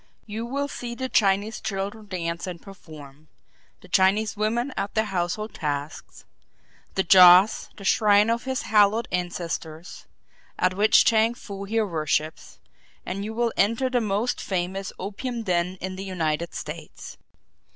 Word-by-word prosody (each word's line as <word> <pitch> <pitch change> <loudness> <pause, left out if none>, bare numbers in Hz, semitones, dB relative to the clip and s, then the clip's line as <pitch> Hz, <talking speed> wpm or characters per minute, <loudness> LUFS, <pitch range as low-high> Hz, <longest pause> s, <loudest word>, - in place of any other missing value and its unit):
You 220 +2 -5
will 280 +3 -2
see 240 -4 -6
the 260 +1 -4
Chinese 205 0 +1
children 205 +1 -4
dance 170 -2 -4
and 175 -2 -6
perform; 155 -6 -13 0.5
the - - -15
Chinese 210 +3 +2
women 235 +5 -1
at 200 - -4
their 220 0 +2
household 195 +2 -3
tasks; 145 0 -5 0.7
the 190 - +2
joss, 185 +3 +7
the 200 - -10
shrine 210 +2 +4
of 235 +2 -2
his 260 -1 -2
hallowed 215 +1 +3
ancestors, 170 -2 -5 0.5
at 185 0 +1
which 205 +3 +4
Chang 225 +1 +3
Foo 200 -4 -8
here 220 +2 0
worships; 155 -3 -2 0.5
and 195 +2 -4
you 220 +2 -5
will 235 -1 0
enter 230 +6 +1
the 245 -1 +1
most 215 +3 -1
famous 190 +1 -3
opium 230 +5 -5
den 180 -1 -1
in 185 0 -5
the 190 - -5
United 170 -3 -2
States. 155 +1 -8
195 Hz, 145 wpm, -25 LUFS, 175-220 Hz, 0.7 s, joss